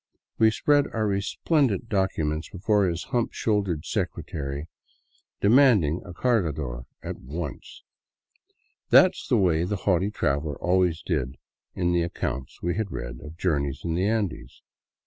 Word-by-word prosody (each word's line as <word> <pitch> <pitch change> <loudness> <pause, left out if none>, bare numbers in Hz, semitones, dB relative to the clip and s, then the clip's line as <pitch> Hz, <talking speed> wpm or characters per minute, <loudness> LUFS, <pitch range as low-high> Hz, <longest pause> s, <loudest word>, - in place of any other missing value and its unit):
We 110 - +6
spread 145 +5 +2
our 110 -1 +1
resplendent 105 - 0
docu 95 -6 0
ment 75 +1 -3
before 100 0 +2
his 85 0 -3
hump 120 -2 +1
shouldered 100 -8 0
secretary, 70 0 -3 0.7
demanding 105 - +5
a 90 - -10
.cargador 75 - -1 0.2
at - - -5
once. 75 +1 -7 1.1
That - - +7
's - - -9
the - - +3
way 85 -4 +3
the 100 +4 -1
haughty 95 0 +2
traveler 70 -6 -1
always 90 -2 +1
did 70 -6 -2 0.4
in 90 -1 +1
the 85 0 +2
accounts 65 -6 -4
we 85 0 +1
had 110 -3 -1
read - - -6
of 80 +1 -10
journeys 70 -6 -1
in 85 - -1
the 90 +4 +1
Andes. 105 -4 -2
90 Hz, 145 wpm, -26 LUFS, 75-105 Hz, 1.1 s, That